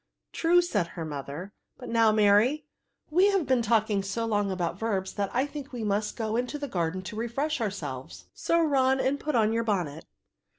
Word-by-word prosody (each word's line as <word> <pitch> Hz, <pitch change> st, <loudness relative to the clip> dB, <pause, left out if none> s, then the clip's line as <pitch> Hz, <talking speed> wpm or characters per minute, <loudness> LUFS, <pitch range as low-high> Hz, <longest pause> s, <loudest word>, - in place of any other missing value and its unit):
True," 350 Hz, +2 st, +4 dB
said 205 Hz, -, 0 dB
her 170 Hz, -1 st, -6 dB
mother; 150 Hz, +6 st, -6 dB, 0.2 s
"but -, -, -9 dB
now, 230 Hz, -1 st, +4 dB
Mary, 215 Hz, +8 st, +4 dB, 0.5 s
we 365 Hz, +5 st, +5 dB
have 390 Hz, -5 st, +2 dB
been 260 Hz, -3 st, +2 dB
talking 220 Hz, -2 st, +2 dB
so 195 Hz, +4 st, -2 dB
long 205 Hz, -3 st, 0 dB
about 175 Hz, -1 st, -2 dB
verbs, 195 Hz, -4 st, -1 dB
that 200 Hz, -1 st, -1 dB
I 255 Hz, +3 st, +1 dB
think 290 Hz, -1 st, -8 dB
we 240 Hz, -3 st, -5 dB
must 210 Hz, 0 st, -1 dB
go 220 Hz, -2 st, -2 dB
into 250 Hz, +5 st, -1 dB
the 285 Hz, -1 st, -4 dB
garden 180 Hz, -4 st, -2 dB
to 190 Hz, -, -7 dB
re 230 Hz, +2 st, -2 dB
fresh 280 Hz, +4 st, -2 dB
ourselves; 130 Hz, -, -5 dB
so 335 Hz, -, +1 dB
run 265 Hz, -3 st, +3 dB
and 270 Hz, +2 st, +1 dB
put 300 Hz, -2 st, -2 dB
on 220 Hz, -1 st, +3 dB
your 230 Hz, 0 st, +1 dB
bonnet." 175 Hz, -8 st, -2 dB
220 Hz, 200 wpm, -28 LUFS, 190-265 Hz, 0.5 s, we